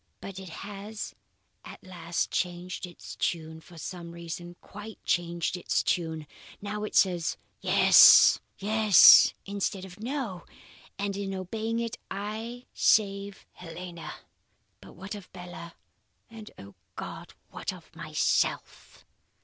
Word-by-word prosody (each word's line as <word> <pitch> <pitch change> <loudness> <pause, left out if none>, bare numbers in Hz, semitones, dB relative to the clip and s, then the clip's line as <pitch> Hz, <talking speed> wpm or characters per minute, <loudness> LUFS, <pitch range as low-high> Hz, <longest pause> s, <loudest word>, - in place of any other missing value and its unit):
"But 195 -1 -8
it 190 -2 -9
has 205 +4 -7 0.5
at - - -12
last 175 -2 -3
changed 180 +1 -3
its 175 - -11
tune, 160 -1 -2
for 170 +1 -16
some 170 +1 -7
reason, 170 +1 -7
quite 210 +1 -10
changed 170 0 -1
its 180 - -1
tune. 160 -3 -1 0.3
Now, 210 +1 -5
it 210 - +4
is 175 -3 -3 0.2
Yes! - - +8 0.2
Yes! 215 0 +7
instead 195 -1 -3
of 185 +1 -13
No! 230 -7 -4 0.5
and 200 0 -2
in 195 -1 -4
obeying 220 +5 -3
it 230 -1 -4
I 220 +5 -6
save 200 -1 +1
Helena. 175 0 -9 0.6
But - - -15
what 190 +4 -8
of 205 -3 -10
Bella? 175 -2 -10 0.6
and 220 -2 -10
O 100 0 -12 0.2
God, - - -8 0.2
what - - -4
of - - -15
myself?" - - -2
190 Hz, 125 wpm, -28 LUFS, 175-210 Hz, 0.6 s, Yes